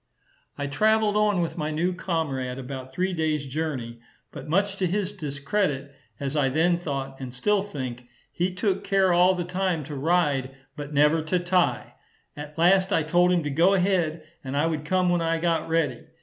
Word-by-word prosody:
I 145 - -3
traveled 215 +8 +2
on 210 -3 +2
with 170 +1 -3
my 150 0 -1
new 170 +4 0
comrade 140 -8 -2
about 130 0 -7
three 185 +6 -1
days' 155 -3 -1
journey; 130 -5 -4 0.3
but - - -9
much 195 +4 +1
to 185 - +1
his 195 +2 -1
discredit, 140 -3 -2 0.3
as 140 +1 -3
I 140 -3 +2
then 170 +5 +2
thought, 135 -5 -4
and 130 -2 -6
still 200 +12 +1
think, 130 -10 -6 0.2
he 180 +2 -1
took 190 +1 -1
care 195 -2 +3
all 180 +2 +5
the 180 - -2
time 180 -2 -1
to 145 +1 -7
ride, 140 -3 +1 0.2
but 145 -1 -7
never 150 +2 +3
to 160 +4 0
tie; 175 - 0 0.4
at 150 +1 -9
last 185 +3 +4
I 165 - +2
told 175 +3 +3
him 175 -2 +2
to 150 - -3
go 170 +7 +4
ahead, 175 -4 +1 0.2
and 135 +1 -4
I 150 - +2
would 155 -2 -2
come 185 +2 +1
when 175 -1 +2
I 165 0 +1
got 165 -1 0
ready. 160 -7 0
165 Hz, 190 wpm, -25 LUFS, 140-185 Hz, 0.4 s, all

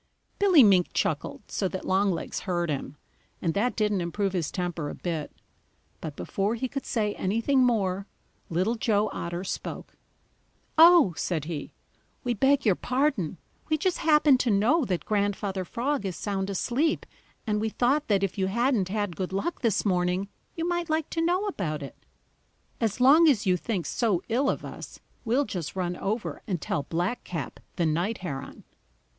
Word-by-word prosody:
Billy 375 -8 +7
Mink 190 -4 +5
chuckled - - -1
so 195 - 0
that 185 0 -5
Longlegs 190 -1 0
heard 175 -4 -1
him, 140 0 -4 0.4
and 165 -2 -1
that 235 +5 0
didn't 210 -3 +1
improve 195 +3 -1
his 170 -5 -1
temper 175 -5 -3
a - - -6
bit. 165 -4 -4 0.7
But 155 -3 -6
before 200 +8 -1
he 260 +3 -2
could 275 +2 -5
say 215 -5 0
anything 230 +8 +1
more, 200 -5 +1 0.4
Little 185 +7 +1
Joe 215 -2 +1
Otter 175 +1 -4
spoke. 190 - -6 0.8
"Oh," 330 - +7
said 160 -5 -2
he, 155 -4 -5 0.5
"we 245 - 0
beg 270 +5 +3
your 205 - +5
pardon. 245 - 0 0.3
We 310 - +2
just 365 +3 0
happen 300 -4 +5
to 250 - +1
know 230 +10 +3
that 180 -5 -2
Grandfather 200 -2 -1
Frog 245 +7 -2
is 190 -3 -3
sound 195 +2 -2
asleep, 255 - 0 0.4
and 210 -2 0
we 220 - 0
thought 270 +7 +1
that 200 -2 +2
if 195 0 -2
you 190 - +2
hadn't 235 -2 +1
had 205 -3 -2
good 185 +1 -3
luck 200 - -2
this 220 -4 +1
morning, 180 0 +1 0.3
you 330 0 -2
might 345 -1 -1
like 315 -1 -1
to 330 - -1
know 360 +4 +1
about 160 - -3
it. 140 - -8 0.8
As 225 -1 -1
long 300 +6 +7
as 225 -8 +2
you 185 -1 +4
think 180 -2 -2
so 195 - 0
ill 265 +4 +2
of - - -2
us, - - -9 0.3
we'll 250 +5 +2
just 175 - -5
run 180 -1 -1
over 210 +5 -3
and 185 -5 -1
tell 145 - -2
Blackcap 175 - -3 0.2
the 170 - +1
Night 175 +8 0
Heron." 135 -4 -6
205 Hz, 170 wpm, -27 LUFS, 180-250 Hz, 0.8 s, Billy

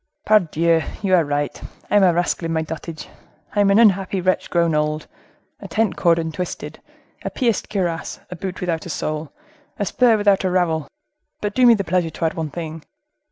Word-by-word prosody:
"Pardieu! 170 -5 +3 0.2
you 190 -2 +1
are 175 -2 +5
right. 145 0 -2 0.3
I - - +3
am - - +5
a 185 -2 +6
rascal 175 0 -1
and - - -2
in - - -1
my 160 0 0
dotage; 160 0 -7 0.5
I - - +1
am 200 - +4
an 200 - +5
unhappy 195 -4 +3
wretch 185 +1 0
grown 170 -2 +2
old; 150 0 0 0.5
a - - -8
tent 220 -2 0
cord 170 -2 +3
untwisted, 165 +2 -5 0.4
a - - -2
pierced 235 -6 -1
cuirass, 175 -5 -2
a - - -4
boot 180 +1 -6
without 170 -2 -2
a - - -8
sole, 155 -1 -3 0.5
a 205 - -1
spur 235 +3 +3
without 205 -2 +3
a 185 - +1
rowel;—but 185 - -3
do 250 +1 +5
me 235 - +8
the 200 - -2
pleasure 175 -1 0
to 165 - -3
add 160 - +1
one 160 -4 -3
thing." 160 0 -6
175 Hz, 200 wpm, -21 LUFS, 160-200 Hz, 0.5 s, me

